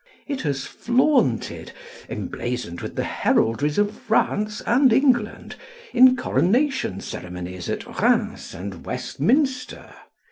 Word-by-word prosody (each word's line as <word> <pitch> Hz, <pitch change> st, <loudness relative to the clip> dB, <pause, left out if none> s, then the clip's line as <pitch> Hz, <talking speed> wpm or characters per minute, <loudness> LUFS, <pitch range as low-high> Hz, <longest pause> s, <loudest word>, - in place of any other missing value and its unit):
It 280 Hz, -2 st, -3 dB
has 140 Hz, -2 st, -2 dB
flaunted, 245 Hz, -, +1 dB, 0.4 s
emblazoned 120 Hz, -8 st, -4 dB
with -, -, -6 dB
the -, -, -1 dB
heraldries 145 Hz, +7 st, +1 dB
of 205 Hz, +1 st, +1 dB
France 210 Hz, -1 st, 0 dB
and 255 Hz, +3 st, +4 dB
England, 240 Hz, -3 st, +1 dB, 0.4 s
in 255 Hz, 0 st, +7 dB
coronation 250 Hz, -, +1 dB
ceremonies 90 Hz, 0 st, -7 dB
at -, -, -3 dB
Rheims -, -, +1 dB
and 95 Hz, 0 st, -7 dB
Westminster. 255 Hz, -, -1 dB
210 Hz, 105 wpm, -23 LUFS, -, 0.4 s, in